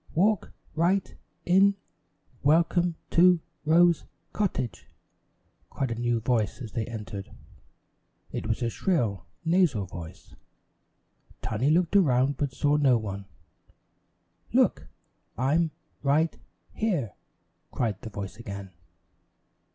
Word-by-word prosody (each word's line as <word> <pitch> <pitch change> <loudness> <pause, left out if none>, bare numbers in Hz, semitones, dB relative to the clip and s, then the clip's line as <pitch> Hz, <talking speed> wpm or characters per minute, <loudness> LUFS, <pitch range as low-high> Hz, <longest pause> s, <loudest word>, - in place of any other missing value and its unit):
"Walk 200 +3 +2 0.2
right 175 +4 +1 0.3
in 195 +3 +5 0.7
Welcome 170 +3 +3 0.2
to 180 0 +6 0.3
Rose 170 +1 +5 0.3
Cottage," 135 - -2 0.8
cried 135 -3 -2
a 115 - -3
new 120 -1 +1
voice 115 -2 0
as 115 -5 -7
they 115 -3 -3
entered. 105 -4 -6 1.0
It - - -4
was 110 +2 -1
a 115 - 0
shrill, 110 - 0 0.2
nasal 165 - +3
voice. 85 -2 -10 1.1
Tiny 115 +6 0
looked 170 +4 +2
around, 135 -6 +4
but 145 -2 -1
saw 145 +2 +2
no 135 -4 +4
one. 100 -3 -5 1.3
"Look! - - +3 0.5
I'm 155 +6 +2 0.3
right 150 +4 +2 0.4
here," 175 - -1 0.6
cried 110 -5 -2
the 110 - -7
voice 100 -1 -6
again. 100 -4 -7
135 Hz, 105 wpm, -27 LUFS, 110-170 Hz, 1.3 s, to